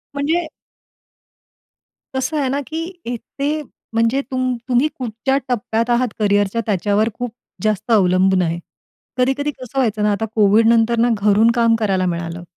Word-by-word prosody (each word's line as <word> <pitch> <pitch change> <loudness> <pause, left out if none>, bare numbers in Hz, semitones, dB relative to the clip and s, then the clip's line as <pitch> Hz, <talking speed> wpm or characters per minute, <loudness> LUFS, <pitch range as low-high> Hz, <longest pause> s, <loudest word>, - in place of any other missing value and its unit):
म्हणजे 315 +4 0 1.7
कसं 265 +4 -1
आहे 270 -2 0
ना 280 +2 0
की 320 +1 -4 0.2
इथे, 280 +5 -3 0.3
म्हणजे 230 +4 +2
तुम 255 -1 0
तुम्ही 255 +3 +3
कुठच्या 250 +2 -1
टप्प्यात 230 -1 -1
आहात 240 +1 +2
करियरच्या 205 +1 +2
त्याच्यावर 205 +2 +1
खूप 245 0 -5 0.3
जास्त 215 +2 -1
अवलंबून 190 -2 +4
आहे. 170 -1 -1 0.6
कधी-कधी 270 +3 +1
कसं 260 -1 -10
व्हायचं 215 -4 0
ना, 210 - +3
आता 215 +2 -1
कोविड 215 +1 +4
नंतर 230 0 +3
ना 240 +1 +3
घरून 210 +3 +4
काम 230 -1 +4
करायला 195 -4 0
मिळालं. 170 -1 -3
230 Hz, 145 wpm, -19 LUFS, 205-255 Hz, 1.7 s, अवलंबून